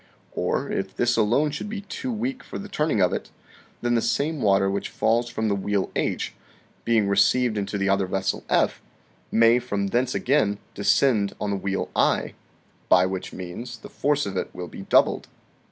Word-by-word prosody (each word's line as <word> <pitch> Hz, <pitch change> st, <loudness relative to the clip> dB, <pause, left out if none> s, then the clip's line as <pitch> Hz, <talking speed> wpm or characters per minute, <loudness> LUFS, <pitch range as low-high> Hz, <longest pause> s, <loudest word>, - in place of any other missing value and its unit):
Or, -, -, -1 dB
if 95 Hz, 0 st, -3 dB
this 120 Hz, 0 st, +2 dB
alone 120 Hz, +7 st, +2 dB
should 150 Hz, +8 st, -5 dB
be 215 Hz, -1 st, -4 dB
too 250 Hz, +5 st, -5 dB
weak 245 Hz, +4 st, -3 dB
for -, -, -7 dB
the 205 Hz, -, -7 dB
turning 150 Hz, -, 0 dB
of 90 Hz, -, +2 dB
it, -, -, -4 dB, 0.5 s
then 120 Hz, 0 st, +2 dB
the 115 Hz, -, +3 dB
same 140 Hz, +6 st, 0 dB
water 95 Hz, -1 st, +3 dB
which 100 Hz, +1 st, -2 dB
falls 120 Hz, +2 st, +1 dB
from 110 Hz, -2 st, -2 dB
the 105 Hz, -, +2 dB
wheel 100 Hz, 0 st, -1 dB
H, -, -, -1 dB, 0.5 s
being 115 Hz, -3 st, +2 dB
re 100 Hz, -, +1 dB
ceived 110 Hz, +4 st, +3 dB
into 100 Hz, 0 st, -2 dB
the 100 Hz, 0 st, 0 dB
other 100 Hz, -1 st, +2 dB
vessel 95 Hz, +1 st, -1 dB
F, -, -, +2 dB, 0.5 s
may 115 Hz, +1 st, +5 dB
from 100 Hz, -5 st, -2 dB
thence 120 Hz, +4 st, 0 dB
again 110 Hz, -7 st, +2 dB, 0.2 s
descend 105 Hz, 0 st, +2 dB
on 105 Hz, -, -2 dB
the -, -, 0 dB
wheel 95 Hz, 0 st, -2 dB
I, -, -, +2 dB, 0.6 s
by 90 Hz, +1 st, +6 dB
which 95 Hz, 0 st, -4 dB
means 105 Hz, +7 st, -7 dB
the -, -, -12 dB
force 145 Hz, -2 st, 0 dB
of 100 Hz, -1 st, -4 dB
it -, -, -2 dB
will 90 Hz, -, -5 dB
be 95 Hz, -, -9 dB
doubled. -, -, +3 dB
110 Hz, 190 wpm, -24 LUFS, 100-125 Hz, 0.6 s, by